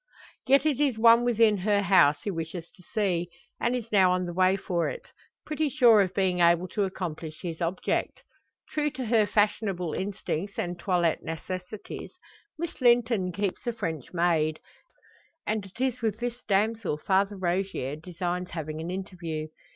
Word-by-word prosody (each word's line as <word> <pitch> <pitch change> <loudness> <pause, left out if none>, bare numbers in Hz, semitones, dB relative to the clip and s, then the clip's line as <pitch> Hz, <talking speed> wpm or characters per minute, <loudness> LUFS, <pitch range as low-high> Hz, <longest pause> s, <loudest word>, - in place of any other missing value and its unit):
Yet 275 +2 +5
it 295 -4 +1
is 275 -6 +2
one 230 +1 +6
within 225 -3 +4
her 200 +2 +1
house 170 -6 +4
he 205 - -2
wishes 165 0 -6
to - - -20
see, 180 -3 -1 0.3
and 240 +1 +1
is 235 -2 -5
now 190 -3 +5
on 180 0 0
the 175 - -5
way 185 +1 +3
for 175 -3 -1
it, - - -8 0.4
pretty 305 0 -1
sure 235 -5 +6
of 185 -1 -1
being 185 -2 +1
able 170 +1 +4
to 205 +2 0
accomplish 165 -5 -6
his 165 -2 -5
object. 175 +2 -1 0.5
True 300 -1 0
to 260 -2 -5
her 220 -2 +3
fashionable 200 -6 0
instincts 195 -1 -3
and 175 0 -3
toilette 175 -3 +1
necessities, 180 +5 -6 0.4
Miss 335 -3 -5
Linton 235 -6 +3
keeps 200 +4 -3
a 240 - 0
French 160 - -4
maid, 165 -3 +1 0.9
and 215 -2 -2
it 195 - -18
is 255 -1 0
with 220 -2 0
this 240 0 -4
damsel 210 -4 +1
Father 195 +5 +1
Rogier 180 -6 -1
designs 180 +2 -4
having 155 -1 -5
an 165 - -5
interview. 175 -4 -5
190 Hz, 165 wpm, -27 LUFS, 175-225 Hz, 0.9 s, one